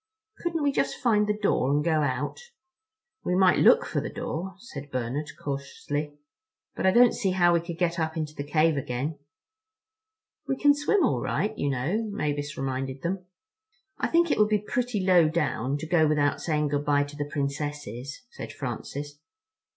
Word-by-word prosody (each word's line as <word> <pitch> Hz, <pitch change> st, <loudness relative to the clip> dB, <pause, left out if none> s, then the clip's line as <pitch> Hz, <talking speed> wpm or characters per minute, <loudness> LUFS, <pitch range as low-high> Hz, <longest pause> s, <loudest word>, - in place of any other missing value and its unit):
"Couldn't 330 Hz, -3 st, -1 dB
we 285 Hz, -, +3 dB
just -, -, 0 dB
find 210 Hz, -4 st, +2 dB
the 210 Hz, 0 st, 0 dB
door 200 Hz, -10 st, +1 dB
and 145 Hz, +1 st, +2 dB
go 160 Hz, -2 st, +2 dB
out?" 140 Hz, 0 st, -2 dB, 0.8 s
"We 180 Hz, -, 0 dB
might 185 Hz, -1 st, +5 dB
look 485 Hz, +1 st, +6 dB
for -, -, -1 dB
the -, -, -4 dB
door," 190 Hz, +4 st, -4 dB
said 145 Hz, -10 st, -9 dB
Bernard 130 Hz, +4 st, -3 dB
cautiously, 145 Hz, +1 st, -4 dB, 0.6 s
"but -, -, 0 dB
I -, -, +6 dB
don't 240 Hz, +3 st, +6 dB
see 195 Hz, -, 0 dB
how 175 Hz, -2 st, +4 dB
we 170 Hz, -, +4 dB
could 170 Hz, 0 st, -7 dB
get 170 Hz, -1 st, 0 dB
up 160 Hz, 0 st, -1 dB
into 155 Hz, -1 st, -3 dB
the 140 Hz, -, -5 dB
cave 155 Hz, +1 st, +2 dB
again." 140 Hz, +3 st, -3 dB, 1.3 s
"We 270 Hz, -, +1 dB
can 290 Hz, +1 st, +5 dB
swim 295 Hz, +7 st, +2 dB
all -, -, +1 dB
right, 215 Hz, +1 st, -1 dB
you 145 Hz, -, -1 dB
know," 140 Hz, -, 0 dB
Mavis 145 Hz, -5 st, -2 dB
reminded 135 Hz, 0 st, -3 dB
them. 180 Hz, +1 st, -3 dB, 0.7 s
"I -, -, +1 dB
think 340 Hz, -1 st, +3 dB
it -, -, +1 dB
would 210 Hz, 0 st, +5 dB
be 210 Hz, -1 st, +1 dB
pretty 245 Hz, -6 st, -1 dB
low 175 Hz, -4 st, +5 dB
down 140 Hz, -5 st, -1 dB
to 150 Hz, -, -6 dB
go 160 Hz, -1 st, +3 dB
without 145 Hz, -1 st, +1 dB
saying 150 Hz, -2 st, 0 dB
good 145 Hz, 0 st, 0 dB
bye 145 Hz, -1 st, +3 dB
to 145 Hz, +1 st, -9 dB
the 145 Hz, 0 st, -4 dB
Princesses," 140 Hz, -, -4 dB
said -, -, -7 dB
Francis. 145 Hz, +3 st, -6 dB
155 Hz, 180 wpm, -27 LUFS, 145-190 Hz, 1.3 s, look